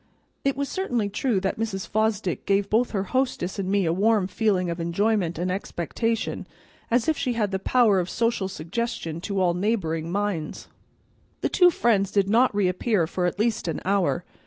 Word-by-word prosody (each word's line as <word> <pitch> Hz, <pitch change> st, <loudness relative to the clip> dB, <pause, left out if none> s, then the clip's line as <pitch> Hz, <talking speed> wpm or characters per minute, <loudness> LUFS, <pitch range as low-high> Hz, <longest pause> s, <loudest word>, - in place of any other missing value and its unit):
It 275 Hz, 0 st, 0 dB
was 280 Hz, 0 st, -1 dB
certainly 245 Hz, -, -1 dB
true 205 Hz, +1 st, 0 dB
that 195 Hz, +2 st, -2 dB
Mrs. 205 Hz, -4 st, -3 dB
Fosdick 215 Hz, -4 st, -1 dB
gave 200 Hz, 0 st, +1 dB
both 235 Hz, +3 st, +3 dB
her 195 Hz, -3 st, -1 dB
hostess 220 Hz, -4 st, -1 dB
and 190 Hz, -1 st, -2 dB
me 200 Hz, -1 st, +2 dB
a 165 Hz, -, +1 dB
warm 210 Hz, +1 st, +3 dB
feeling 190 Hz, -1 st, 0 dB
of 170 Hz, -, -5 dB
enjoyment 175 Hz, +1 st, 0 dB
and 180 Hz, +2 st, -1 dB
expectation, 215 Hz, +4 st, -2 dB, 0.4 s
as 235 Hz, 0 st, +2 dB
if 315 Hz, -, +3 dB
she 260 Hz, -3 st, 0 dB
had 210 Hz, -4 st, 0 dB
the 190 Hz, -, -1 dB
power 215 Hz, -2 st, +3 dB
of 180 Hz, 0 st, -2 dB
social 230 Hz, -4 st, 0 dB
suggestion 170 Hz, -1 st, -4 dB
to 200 Hz, +1 st, -2 dB
all 180 Hz, -2 st, +3 dB
neighboring 170 Hz, -5 st, -1 dB
minds. 200 Hz, -5 st, -3 dB, 0.7 s
The -, -, 0 dB
two 360 Hz, -1 st, +6 dB
friends 220 Hz, -, +2 dB
did 200 Hz, -1 st, +1 dB
not 235 Hz, 0 st, +4 dB
reappear 190 Hz, 0 st, +1 dB
for 180 Hz, +2 st, -1 dB
at 175 Hz, -, -3 dB
least 220 Hz, -3 st, 0 dB
an 165 Hz, -, -2 dB
hour. 185 Hz, -2 st, +1 dB
200 Hz, 185 wpm, -25 LUFS, 180-225 Hz, 0.7 s, two